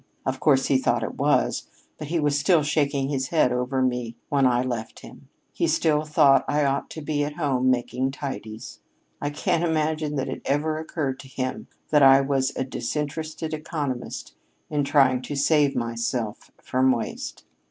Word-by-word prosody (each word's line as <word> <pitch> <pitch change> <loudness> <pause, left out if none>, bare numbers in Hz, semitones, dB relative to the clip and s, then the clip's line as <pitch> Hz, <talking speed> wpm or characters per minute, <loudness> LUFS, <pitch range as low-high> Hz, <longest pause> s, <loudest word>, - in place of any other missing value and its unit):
Of 130 0 -2
course 135 -3 +3
he 135 - +3
thought - - +1
it - - -3
was; - - +1 0.3
but 150 - -5
he 165 +2 0
was 145 -1 +1
still 155 +2 +3
shaking 145 -2 0
his 135 -2 -1
head 155 -7 +3
over 125 +2 0
me 125 -2 -1
when 140 -2 +3
I 125 0 +2
left 120 -3 -5
him. - - -14 0.2
He - - 0
still 155 -1 +2
thought 150 -2 +5
I 150 0 +1
ought 140 0 -1
to 160 - -8
be 145 -1 0
at 145 0 -4
home 130 -5 +1
making 125 +1 0
tidies. 110 -4 -7 0.4
I 145 - -1
can't 155 +3 0
imagine 155 -2 0
that 135 -1 -1
it 130 - -5
ever 155 +2 0
occurred 145 -4 -3
to 140 - -11
him 130 -1 -4 0.2
that 150 -1 +5
I 135 0 +8
was 135 -1 0
a - - -1
disinterested 155 +4 -4
economist 150 -5 -4 0.4
in 145 -1 +1
trying 135 -3 +3
to 145 - -5
save 145 0 +3
myself 115 -1 -3
from 130 +1 +2
waste." 120 -3 -4
140 Hz, 175 wpm, -25 LUFS, 130-150 Hz, 0.4 s, I